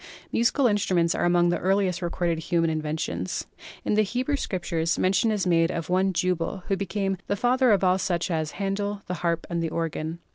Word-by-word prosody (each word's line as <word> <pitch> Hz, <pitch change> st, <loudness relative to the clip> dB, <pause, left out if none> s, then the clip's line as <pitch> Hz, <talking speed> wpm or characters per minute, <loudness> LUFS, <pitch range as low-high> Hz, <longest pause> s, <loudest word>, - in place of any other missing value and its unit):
Musical 240 Hz, +4 st, +2 dB
instruments 185 Hz, -6 st, +2 dB
are -, -, 0 dB
among 175 Hz, 0 st, +4 dB
the 175 Hz, -, 0 dB
earliest 190 Hz, -1 st, +1 dB
recorded 170 Hz, -1 st, -1 dB
human 165 Hz, 0 st, +1 dB
inventions. 155 Hz, -11 st, -3 dB, 0.4 s
In -, -, +1 dB
the 215 Hz, -, +4 dB
Hebrew 250 Hz, +7 st, -1 dB
scriptures 175 Hz, -8 st, -1 dB
mention 195 Hz, +5 st, +2 dB
is 210 Hz, -3 st, 0 dB
made 165 Hz, -2 st, +3 dB
of 165 Hz, -1 st, -4 dB
one 190 Hz, +1 st, +3 dB
Jubal, 180 Hz, 0 st, -1 dB
who 195 Hz, -, +3 dB
became 195 Hz, 0 st, -2 dB
"the 200 Hz, -, 0 dB
father 250 Hz, +4 st, +3 dB
of 200 Hz, -2 st, +3 dB
all 185 Hz, 0 st, +3 dB
such 175 Hz, -1 st, -1 dB
as 155 Hz, -2 st, -1 dB
handle 200 Hz, +1 st, -2 dB
the 180 Hz, -, -4 dB
harp 170 Hz, -1 st, 0 dB
and 170 Hz, -1 st, -2 dB
the 165 Hz, -, -1 dB
organ." 165 Hz, 0 st, -3 dB
180 Hz, 190 wpm, -26 LUFS, 170-200 Hz, 0.4 s, among